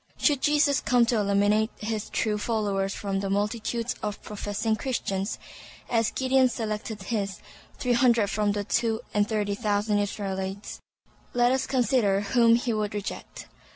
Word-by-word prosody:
Should 285 -4 +2
Jesus 295 -1 +3
come 245 -2 +3
to 235 0 +1
eliminate 205 +2 +2
his 215 0 -3
true 210 -1 0
followers 200 -3 -1
from 195 -1 -2
the 195 0 -3
multitudes 225 +4 -1
of 210 -1 -3
professing 210 +1 -2
Christians, 205 -5 -2 0.5
as 230 -2 +2
Gideon 260 0 +3
selected 215 -3 -4
his, 200 -3 -2 0.4
three 250 -1 +1
hundred 235 -4 +3
from 210 -1 +1
the 205 0 -2
two 225 +2 0
and 205 0 +2
thirty 210 -2 0
thousand 205 -1 0
Israelites, 195 -1 -4 0.5
let 245 0 +4
us 265 0 0
consider 240 -6 +2
whom 230 +3 +4
he 240 0 0
would 210 -1 -2
reject. 205 0 -6
215 Hz, 150 wpm, -26 LUFS, 205-240 Hz, 0.5 s, let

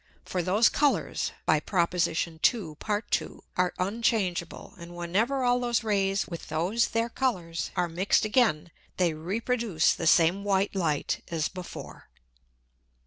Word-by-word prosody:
For 180 - -2
those 200 +6 +4
Colours 275 - +1
(by 155 - +3
Prop. 170 +1 0
II. 165 +1 0
Part 210 0 -3
2.) - - -2
are 180 -1 +2
unchangeable, 195 -3 -1
and 170 +1 -10
whenever 210 +11 0
all 245 0 +3
those 240 -1 0
Rays 195 -2 +1
with 170 -2 -7
those 180 +10 +1
their 230 0 0
Colours 185 - -2
are 180 -2 +1
mix'd 180 +6 +1
again, 210 - +2 0.3
they 175 -3 +2
reproduce 200 +2 0
the 165 - -3
same 170 +5 +4
white 200 0 +1
Light 165 -7 -1
as 160 -3 -1
before. 185 -2 -9
185 Hz, 140 wpm, -27 LUFS, 170-225 Hz, 0.3 s, those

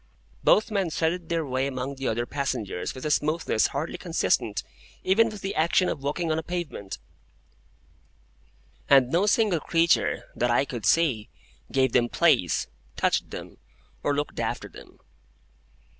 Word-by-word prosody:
Both 215 +2 +4
men 195 -4 0
threaded 165 +2 -1
their 165 -2 0
way 130 0 -1
among 130 0 -4
the 135 -1 -4
other 120 +2 0
passengers 125 -10 -3
with 130 - -7
a 150 - 0
smoothness 150 -6 +1
hardly 160 +5 -4
consistent 140 - 0 0.4
even 225 +5 +4
with 210 -3 -9
the 195 - -3
action 170 +3 +2
of - - -4
walking 155 +4 -1
on 155 - +1
a - - -2
pavement; 165 - -5 1.9
and 130 -2 +6
no 180 +5 +2
single 210 -5 +3
creature, 165 +1 +2
that 120 - +1
I 120 +3 +3
could 120 -6 -4
see, 135 -10 +2 0.4
gave 130 -1 +2
them 120 -1 +2
place, - - +3 0.3
touched - - +1
them, - - -9 0.4
or 145 - 0
looked 145 +1 -3
after - - -2
them. - - -14
150 Hz, 150 wpm, -26 LUFS, 130-170 Hz, 1.9 s, and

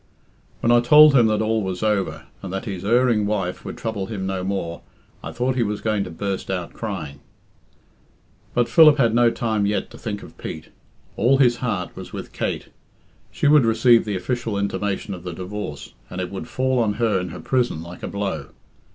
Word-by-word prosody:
"When 115 - +2
I 120 - +6
told 150 +5 +7
him 120 -4 +5
that 110 0 +1
all 110 0 +1
was 95 0 -3
over, 105 -3 -1 0.2
and 95 - -6
that 95 +3 -4
his 95 -5 -5
erring 115 -1 +3
wife 95 -4 -2
would - - -7
trouble 105 -4 -3
him 100 -4 -4
no 95 -1 -2
more, 90 -3 -3 0.4
I - - -5
thought 125 +1 -1
he 125 - +1
was 105 -2 -1
going 105 -3 0
to - - -7
burst 95 +3 -4
out 90 -3 -3
crying." 85 -11 -5 1.4
But 120 -1 +3
Philip 155 -3 +7
had 115 -5 +3
no 120 0 +5
time 110 -3 -1
yet 105 - -2
to - - -12
think 105 -3 -5
of - - -14
Pete. 80 - -7 0.5
All 125 +6 +4
his 120 -3 +4
heart 115 -8 -3
was - - -9
with - - -7
Kate. - - -3 0.6
She - - -1
would 150 -2 +6
receive 115 +1 +4
the 105 -2 -2
official 115 +2 -2
intimation 100 0 -2
of 90 - -8
the 90 0 -6
divorce, 90 -3 -6 0.2
and 90 - -6
it 90 -1 -3
would 95 - -6
fall 130 0 0
on 110 -3 +1
her 110 -3 +1
in 90 0 -4
her 90 - -8
prison 120 -11 0
like 85 +1 -10
a - - -4
blow. 100 -1 -3
105 Hz, 205 wpm, -22 LUFS, 95-120 Hz, 1.4 s, told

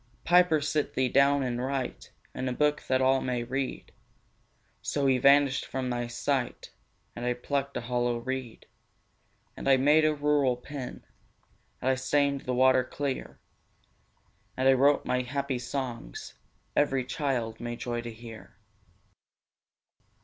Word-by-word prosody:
'Piper, 175 -2 +5
sit 150 0 -1
thee 130 -1 +1
down 140 +1 +4
and 125 -1 -2
write 130 - -3 0.2
In 130 0 -3
a - - -2
book, 150 +3 +1
that 130 0 +2
all 130 0 +3
may 125 -2 -2
read.' 135 +2 -4 0.9
So 145 -1 -1
he 130 -1 +3
vanished 140 0 +4
from 130 -1 -3
my 120 -1 -2
sight; 125 +1 -2 0.4
And 120 - -6
I 125 0 0
plucked 140 +2 -2
a - - -3
hollow 120 0 0
reed, 130 -1 -5 0.9
And - - -2
I 135 - +6
made 150 +4 +4
a 155 0 +3
rural 145 -4 +2
pen, 130 +1 -8 0.7
And 130 - +1
I - - +3
stained 140 +1 0
the 125 - -1
water 130 0 +5
clear, 140 +1 -4 1.2
And 130 +1 +2
I 135 - +7
wrote 140 +2 +3
my 125 - +1
happy 135 0 -3
songs 120 - -5 0.4
Every 135 -3 +2
child 125 -6 -2
may 120 0 -4
joy 120 0 -3
to 120 0 -7
hear. 115 0 -12
130 Hz, 145 wpm, -28 LUFS, 125-140 Hz, 1.2 s, I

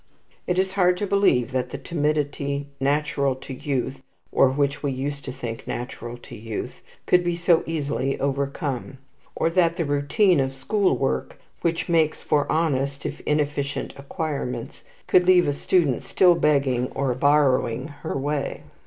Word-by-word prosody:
It 180 - 0
is 190 0 +1
hard 180 -2 +3
to 205 - -1
believe 190 -12 +2
that 130 -1 -1
the - - -5
timidity 145 -2 -1
natural 140 -1 +1
to 130 +1 -9
youth 135 -1 -3 0.3
or 135 - +5
which 140 +1 0
we 145 - -1
used 140 +2 -4
to 130 - -4
think 120 -3 -6
natural 120 -1 -5
to - - -12
youth 110 0 -6 0.2
could 180 0 +4
be 175 -1 0
so 170 -1 +3
easily 140 -4 -1
overcome; 140 -1 -2 0.4
or 165 - +1
that 170 -1 +3
the 165 - 0
routine 145 +6 +2
of 135 0 -1
school 185 +2 +1
work, 65 - -2 0.2
which 165 -1 0
makes 160 -3 +2
for 145 -1 +1
honest 140 -3 0
if - - -4
inefficient 145 -1 -1
acquirements, 140 -4 -4 0.2
could 180 0 +4
leave 180 -1 +6
a 145 - +1
student 145 -3 +1
still 180 -2 +4
begging 140 -6 +1
or 135 -2 0
borrowing 140 -1 +2
her - - -3
way. 145 +1 -2
145 Hz, 155 wpm, -24 LUFS, 135-165 Hz, 0.4 s, leave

